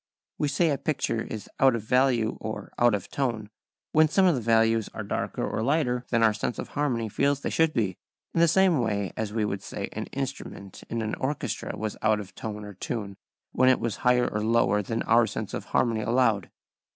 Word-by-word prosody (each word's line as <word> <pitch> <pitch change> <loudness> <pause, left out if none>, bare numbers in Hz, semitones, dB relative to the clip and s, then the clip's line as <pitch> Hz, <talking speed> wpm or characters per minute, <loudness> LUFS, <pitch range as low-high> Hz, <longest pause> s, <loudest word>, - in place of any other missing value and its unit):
We 150 - +1
say 155 +3 +2
a 140 - -1
picture 135 -6 -1
is 110 -2 -6
out 135 -2 +5
of 115 - -4
value 125 -1 +2
or 110 0 -6
out 120 -3 +5
of 100 -2 -5
tone 115 -6 -2 0.4
when 155 0 +5
some 190 +5 +3
of 180 - +5
the 130 - -1
values 115 -1 +3
are - - -4
darker - - -2
or - - -2
lighter 125 -2 0
than 115 -2 +2
our 110 -1 +5
sense 105 +3 -3
of - - -5
harmony 130 -6 -1
feels 140 +6 +1
they - - -2
should 160 -1 +3
be, 100 - -1 0.3
in - - 0
the 170 - +6
same 185 -2 +4
way 105 -5 -1
as 110 -2 -3
we 110 0 0
should 100 -2 -2
say - - -5
an - - -4
instrument 135 -8 -6
in 115 -1 -2
an 110 - -3
orchestra 130 -6 -3
was 110 0 -4
out 110 -1 +3
of 95 -3 -9
tone 105 0 -6
or 105 - -8
tune 100 0 -5 0.4
when 130 +1 +4
it 130 - +4
was 115 -3 -2
higher 125 0 +3
or 105 0 -2
lower 110 -2 +3
than 115 +3 -2
our 115 0 +4
sense - - -5
of - - -4
harmony 115 -2 +1
allowed. 115 -4 +2
115 Hz, 215 wpm, -27 LUFS, 110-135 Hz, 0.4 s, the